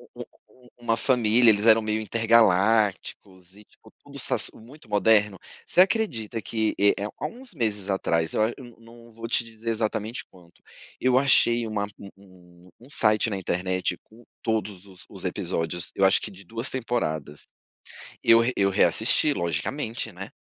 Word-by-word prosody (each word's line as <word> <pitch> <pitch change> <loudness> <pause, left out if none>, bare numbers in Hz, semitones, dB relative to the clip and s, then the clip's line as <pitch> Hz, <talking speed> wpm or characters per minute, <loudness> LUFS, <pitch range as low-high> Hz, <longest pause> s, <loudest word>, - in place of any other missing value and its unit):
um - - -15
um - - -26 0.2
um 125 - -19
uma 120 -1 0
família, 120 -1 +3
eles 105 +1 +2
eram 110 0 +6
meio 110 0 -2
intergalácticos 105 -3 +1
e, 105 - -15
tipo, - - -22
tudo - - -8
sas - - 0
muito 135 +8 -16
moderno? 105 -2 +2 0.3
Você - - -1
acredita 125 - 0
que, 110 -1 -2
eh 100 +1 +4
eh, 100 - -3
há - - -3
uns 245 -3 -6
meses 105 - -2
atrás, 85 -4 0
eu 110 - +2
ach 115 - 0
eu 120 -4 -13
não 115 0 -16
vou 115 +1 -7
te 120 - +1
dizer 115 0 -7
exatamente 110 0 -2
quando, 85 -2 -20 0.5
eu 130 0 +2
achei 120 -3 +3
uma 105 -2 -2
um 100 - -11
um 90 -2 -20
um 125 - -16
site 110 -5 +3
na 100 - -3
internet 95 0 -2
com 115 +2 -20 0.2
todos 105 -4 -3
os 95 -2 -15
os - - -8
episódios, 85 +1 -3
eu 95 - 0
acho 95 - +4
que - - -4
de 95 +1 -14
2 115 +6 -2
temporadas. 80 - -4 0.8
Eu 115 0 +6 0.2
eu 100 0 +2
reassisti, 110 +8 +3
logicamente, 110 - -3
né. - - -9
110 Hz, 170 wpm, -25 LUFS, 95-115 Hz, 0.8 s, eram